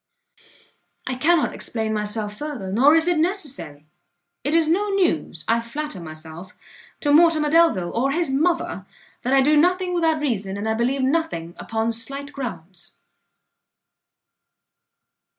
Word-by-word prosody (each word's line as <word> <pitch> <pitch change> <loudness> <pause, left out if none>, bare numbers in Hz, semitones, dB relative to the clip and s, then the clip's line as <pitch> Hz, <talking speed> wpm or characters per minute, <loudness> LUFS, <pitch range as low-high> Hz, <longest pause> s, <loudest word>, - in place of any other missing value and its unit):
I 255 - -2
cannot 315 +5 +2
explain 220 -2 -2
myself 210 0 -3
further, 260 -8 -5
nor 270 +9 +5
is 325 +1 +3
it 350 -3 +2
necessary; 290 - -2 0.6
it 290 +4 0
is 330 -2 +3
no 395 +6 +1
news, 390 -3 0
I 230 +1 +2
flatter 295 +1 -6
myself, 160 +2 -10 0.4
to 290 -1 +2
Mortimer 310 -2 +4
Delvile 315 - +3
or 255 +4 0
his 330 -1 0
mother, 335 +6 0 0.3
that 255 - -1
I 270 - +5
do 295 +3 +4
nothing 360 +3 +2
without 325 -3 +1
reason, 205 -9 -2
and 205 +2 -3
I 220 - +1
believe 255 +4 0
nothing 265 - -1
upon 225 0 -2
slight 275 +5 -4
grounds. 180 - -8
270 Hz, 135 wpm, -22 LUFS, 215-320 Hz, 0.6 s, nor